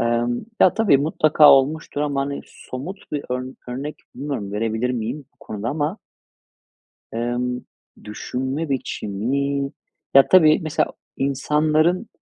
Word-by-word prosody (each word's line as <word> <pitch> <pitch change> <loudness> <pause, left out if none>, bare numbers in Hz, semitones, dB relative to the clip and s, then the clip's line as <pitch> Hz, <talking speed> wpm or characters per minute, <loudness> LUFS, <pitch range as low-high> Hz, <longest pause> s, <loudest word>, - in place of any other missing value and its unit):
Imm, 120 - 0 0.2
ya - - +6
tabii 220 -10 +4
mutlaka 155 0 +5
olmuştur 145 +2 +2
ama 145 -2 0
hani 140 +1 -3
somut 160 +9 -9
bir 145 - -2
örn 125 +1 -3
örnek 140 +5 -5 0.2
bilmiyorum 135 -9 -4
verebilir 110 +3 -1
miyim 125 +4 -3
bu - - -42
konuda 110 +2 -5
ama 150 - -1 1.2
ımm, 120 +1 -2 0.4
düşünme 130 +8 -3
biçimi 140 +4 -1 0.4
ya 135 0 +7
tabii 155 -5 +6
mesela 155 -2 0 0.2
insanların, 155 - +1
140 Hz, 120 wpm, -22 LUFS, 125-150 Hz, 1.2 s, ya